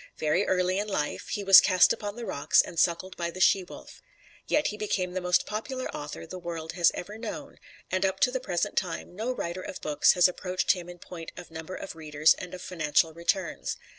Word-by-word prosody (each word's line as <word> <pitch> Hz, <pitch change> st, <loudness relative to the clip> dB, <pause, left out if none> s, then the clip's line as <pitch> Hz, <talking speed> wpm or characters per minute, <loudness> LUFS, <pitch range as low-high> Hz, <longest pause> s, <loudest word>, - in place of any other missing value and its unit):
Very 155 Hz, +6 st, +1 dB
early 185 Hz, +1 st, +1 dB
in 210 Hz, -, -2 dB
life 150 Hz, -8 st, -3 dB
he 205 Hz, -, -3 dB
was 195 Hz, -1 st, +10 dB
cast 185 Hz, -3 st, +5 dB
upon 205 Hz, -1 st, -6 dB
the 240 Hz, -1 st, -6 dB
rocks 145 Hz, -5 st, +2 dB
and 170 Hz, -, -5 dB
suckled 180 Hz, +2 st, +1 dB
by 170 Hz, -1 st, -2 dB
the 180 Hz, -, -9 dB
she 190 Hz, +1 st, +4 dB
wolf. 180 Hz, -, -12 dB, 0.5 s
Yet 295 Hz, 0 st, +2 dB
he 210 Hz, -, -5 dB
became 195 Hz, -4 st, -2 dB
the 185 Hz, -, -2 dB
most 180 Hz, 0 st, +2 dB
popular 255 Hz, +5 st, -4 dB
author 145 Hz, +2 st, -7 dB
the 185 Hz, +3 st, -8 dB
world 165 Hz, -2 st, -5 dB
has 175 Hz, -1 st, +4 dB
ever 210 Hz, +4 st, -7 dB
known, 225 Hz, -2 st, -7 dB, 0.3 s
and 185 Hz, +1 st, 0 dB
up 190 Hz, 0 st, 0 dB
to 250 Hz, -, +4 dB
the 260 Hz, -, -2 dB
present 175 Hz, -9 st, -2 dB
time 180 Hz, -1 st, -3 dB
no 225 Hz, +6 st, -2 dB
writer 180 Hz, -7 st, -4 dB
of 185 Hz, -, -7 dB
books 150 Hz, -1 st, +3 dB
has 180 Hz, -1 st, +5 dB
approached 180 Hz, 0 st, 0 dB
him 180 Hz, -2 st, -4 dB
in 175 Hz, -, -9 dB
point 170 Hz, -2 st, -9 dB
of 175 Hz, -2 st, -10 dB
number 160 Hz, +3 st, -7 dB
of 195 Hz, -, -7 dB
readers 155 Hz, -1 st, +3 dB
and 180 Hz, 0 st, -7 dB
of 180 Hz, -, -9 dB
financial 160 Hz, -2 st, +1 dB
returns. 170 Hz, +1 st, -2 dB
180 Hz, 220 wpm, -28 LUFS, 170-195 Hz, 0.5 s, was